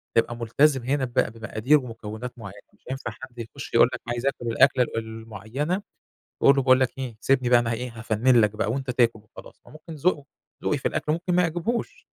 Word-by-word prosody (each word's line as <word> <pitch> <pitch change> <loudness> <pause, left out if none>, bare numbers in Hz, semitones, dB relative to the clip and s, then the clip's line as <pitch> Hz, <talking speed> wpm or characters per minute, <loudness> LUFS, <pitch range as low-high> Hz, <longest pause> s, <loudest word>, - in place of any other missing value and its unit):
بتبقى 115 +1 +2
مُلتزم 130 +4 +2
هنا 135 +2 0
بمق 120 - +1
بمقادير 110 +5 +1
ومكونات 115 -1 -7
معينة. 100 -1 -9
مش - - -30
هينفع 130 -3 -4
حد 120 +2 -12
يخش 135 +5 -8
يقول 115 +1 +6
لَك - - -5
عايز 120 +1 -3
آكل 135 -3 -1
الأكلة 125 +2 +4
ال 115 - -5
المُعيّنة، 115 - -4 0.6
وأقول 140 - +6
له 135 - +2
باقول 130 0 +5
لَك 130 0 0
إيه، 125 -4 -5
سيبني 130 -1 +2
بقى 120 0 +6
أنا 120 -1 -1
ه - - 0
إيه؟ 125 +2 -5
هافنِّن 115 +2 +3
لَك 105 -1 +3
بقى، 105 0 0
وأنتَ 135 0 -3
تاكل 120 -2 +2
وخلاص. 105 - -15
فممكن 155 +2 -11
ذوقه 155 -1 0 0.4
ذوقي 145 - +1
في - - -1
الأكل، 150 - -1
ممكن 175 +3 -1
ما 180 - +4
يعجبهوش. 180 - -2
125 Hz, 205 wpm, -25 LUFS, 115-140 Hz, 0.6 s, يقول